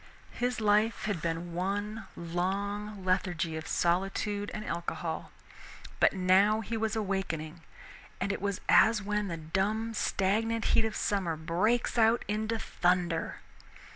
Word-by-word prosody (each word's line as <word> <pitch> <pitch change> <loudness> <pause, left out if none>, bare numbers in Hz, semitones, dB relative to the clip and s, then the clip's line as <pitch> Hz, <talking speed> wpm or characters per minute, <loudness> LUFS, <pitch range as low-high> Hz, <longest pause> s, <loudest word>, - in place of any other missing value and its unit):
His 245 0 -1
life 215 +1 +2
had 205 -7 -1
been 170 +1 -3
one 205 +4 -2
long 195 +4 -3
lethargy 175 -3 0
of 160 0 -5
solitude 195 +4 0
and 215 0 -5
alcohol, 170 0 -4 0.7
but - - +5
now 195 +3 +4
he 225 +2 -4
was 220 0 -1
awakening, 180 -6 -2 0.6
and 200 - 0
it - - -5
was 200 -1 -2
as 225 0 +6
when 210 0 -1
the 170 -3 -4
dumb 200 +8 -1
stagnant 220 +3 0
heat 225 - +4
of 220 0 -3
summer 190 -5 0
breaks 190 +10 +1
out 225 +1 +4
into 220 +2 -1
thunder. 175 -5 0
200 Hz, 135 wpm, -30 LUFS, 175-215 Hz, 0.7 s, as